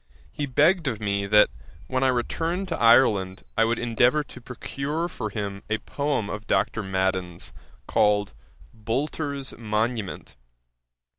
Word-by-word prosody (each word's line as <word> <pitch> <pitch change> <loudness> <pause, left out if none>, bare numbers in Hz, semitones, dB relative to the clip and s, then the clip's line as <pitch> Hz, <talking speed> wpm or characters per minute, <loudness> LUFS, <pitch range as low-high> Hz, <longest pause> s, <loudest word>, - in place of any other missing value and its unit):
he 145 - -3
begged 155 +5 +3
of 110 -5 -1
me 100 -1 -1
that 105 +1 +6 0.4
when 130 0 -1
I - - +4
returned 165 +9 -1
to - - -1
Ireland, 110 -6 +4
I 115 - +4
would 115 +1 +1
endeavour 120 +5 +2
to 130 -3 -12
procure 140 +6 -3
for 110 -10 -5
him 100 -1 -4
a 110 - +1
poem 140 -3 -2
of 105 +1 -6
Dr. 110 - +1
Madden's 95 -3 -1 0.3
called 105 -5 +2 0.4
Boulter's 140 +5 -3
Monument. 110 - -2
115 Hz, 135 wpm, -25 LUFS, 105-140 Hz, 0.4 s, that